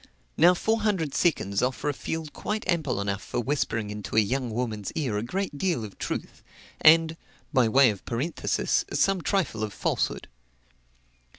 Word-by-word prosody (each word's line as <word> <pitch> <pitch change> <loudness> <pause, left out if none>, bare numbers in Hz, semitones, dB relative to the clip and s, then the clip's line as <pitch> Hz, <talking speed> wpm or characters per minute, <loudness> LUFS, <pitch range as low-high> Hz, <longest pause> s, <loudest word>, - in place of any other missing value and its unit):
Now, 175 +3 +6
four 220 +4 0
hundred 190 -9 0
seconds 100 - +1
offer 130 +3 -1
a 145 - +1
field 160 +2 -5
quite 210 +2 -4
ample 155 - 0
enough 100 0 -2
for - - -4
whispering 115 -5 -1
into 105 0 -6
a - - +7
young 125 +4 0
woman's 110 -3 -3
ear 135 -9 -1
a 105 - 0
great 145 - -3
deal 170 -11 0
of 100 - -12
truth; - - -5 0.4
and 165 +1 +6 0.4
(by 125 -5 +4
way 130 0 +6
of 100 - -9
parenthesis) 130 +9 -1
some 195 -2 +2
trifle 180 - 0
of 105 -2 -3
falsehood. - - -1
135 Hz, 165 wpm, -26 LUFS, 110-170 Hz, 0.4 s, a